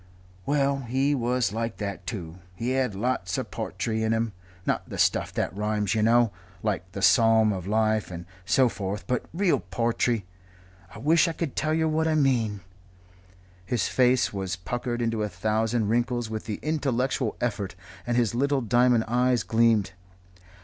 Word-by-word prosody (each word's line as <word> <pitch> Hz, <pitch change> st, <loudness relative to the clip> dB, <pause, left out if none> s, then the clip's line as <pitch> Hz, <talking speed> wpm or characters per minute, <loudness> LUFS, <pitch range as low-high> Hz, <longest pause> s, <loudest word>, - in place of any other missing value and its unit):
"Well, 140 Hz, -1 st, +2 dB
he 135 Hz, +3 st, 0 dB
was 125 Hz, -4 st, 0 dB
like 115 Hz, +1 st, -3 dB
that 100 Hz, -2 st, -5 dB
too. 90 Hz, -4 st, -6 dB, 0.2 s
He 115 Hz, +7 st, -2 dB
had 130 Hz, -5 st, 0 dB
lots 100 Hz, -4 st, -1 dB
of -, -, -4 dB
po'try 110 Hz, -1 st, -3 dB
in 110 Hz, 0 st, +1 dB
him 115 Hz, -1 st, -1 dB, 0.3 s
not -, -, -1 dB
the -, -, -6 dB
stuff -, -, +2 dB
that 85 Hz, -, -2 dB
rhymes, 105 Hz, -1 st, 0 dB
yer 110 Hz, -, +1 dB
know, 115 Hz, 0 st, +4 dB, 0.3 s
like 95 Hz, -4 st, -2 dB
'The 100 Hz, -, -4 dB
Psalm 115 Hz, -3 st, +5 dB
of 95 Hz, -1 st, -5 dB
Life' 110 Hz, 0 st, +1 dB
and 85 Hz, -1 st, -7 dB, 0.2 s
so 130 Hz, +7 st, +4 dB
forth, 100 Hz, -2 st, -4 dB
but 125 Hz, -, -1 dB
real 180 Hz, +2 st, +2 dB
po'try. 115 Hz, -1 st, 0 dB, 0.7 s
I -, -, -11 dB
wish 160 Hz, +4 st, +3 dB
I 165 Hz, -, -1 dB
could 160 Hz, -4 st, -4 dB
tell 155 Hz, +2 st, 0 dB
yer 160 Hz, 0 st, +2 dB
what 160 Hz, +1 st, +1 dB
I 160 Hz, -, +2 dB
mean 120 Hz, -8 st, +1 dB, 0.5 s
" 90 Hz, 0 st, -28 dB, 0.3 s
His 120 Hz, -1 st, 0 dB
face 125 Hz, -2 st, +3 dB
was 95 Hz, -1 st, -3 dB
puckered 120 Hz, +5 st, -3 dB
into 115 Hz, -1 st, -1 dB
a 105 Hz, -, -1 dB
thousand 110 Hz, +4 st, 0 dB
wrinkles 120 Hz, 0 st, 0 dB
with 110 Hz, -1 st, -4 dB
the 105 Hz, -2 st, -4 dB
intellectual 135 Hz, -5 st, 0 dB
effort, 100 Hz, -6 st, -2 dB, 0.3 s
and 120 Hz, 0 st, +1 dB
his 120 Hz, -3 st, +2 dB
little 140 Hz, +2 st, +1 dB
diamond 120 Hz, 0 st, +3 dB
eyes 125 Hz, -1 st, +2 dB
gleamed. 110 Hz, -1 st, +3 dB
115 Hz, 170 wpm, -26 LUFS, 105-125 Hz, 0.7 s, Psalm